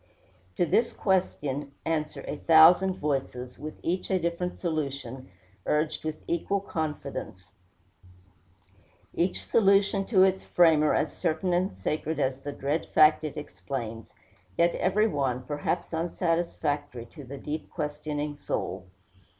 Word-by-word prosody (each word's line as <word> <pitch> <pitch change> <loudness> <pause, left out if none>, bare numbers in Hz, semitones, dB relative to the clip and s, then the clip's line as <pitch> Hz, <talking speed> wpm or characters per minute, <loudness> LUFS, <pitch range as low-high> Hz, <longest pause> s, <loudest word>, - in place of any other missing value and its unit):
To 175 - +3
this 225 +8 +2
question 145 -7 -1
answer 155 -2 -2
a - - -3
thousand 170 +5 +6
voices, 135 -4 -3
with 155 +2 -6
each 180 +2 -1
a 190 - +3
different 170 +1 -2
solution, 140 -6 -3 0.4
urged 150 +1 0
with 155 -1 -5
equal 170 +4 0
confidence 145 - -5 1.6
each 180 +2 0
solution 200 -2 +3
to 190 -4 +5
its 190 0 +2
framer 160 -3 +4
as 150 - 0
certain 175 +1 0
and 185 +3 0
sacred 155 +1 -2
as 130 0 0
the 145 +1 -5
dread 145 +3 -2
fact 155 0 +6
it 155 - -5
explains 120 -6 -6 0.5
yet 170 0 +4
every 210 +4 +2
one, 130 - -1
perhaps, 145 +6 -3
unsatisfactory 160 -6 -1
to 145 +5 -12
the 135 +2 -8
deep 150 +3 -5
questioning 150 0 -3
soul. 95 -8 -4
155 Hz, 125 wpm, -28 LUFS, 140-175 Hz, 1.6 s, thousand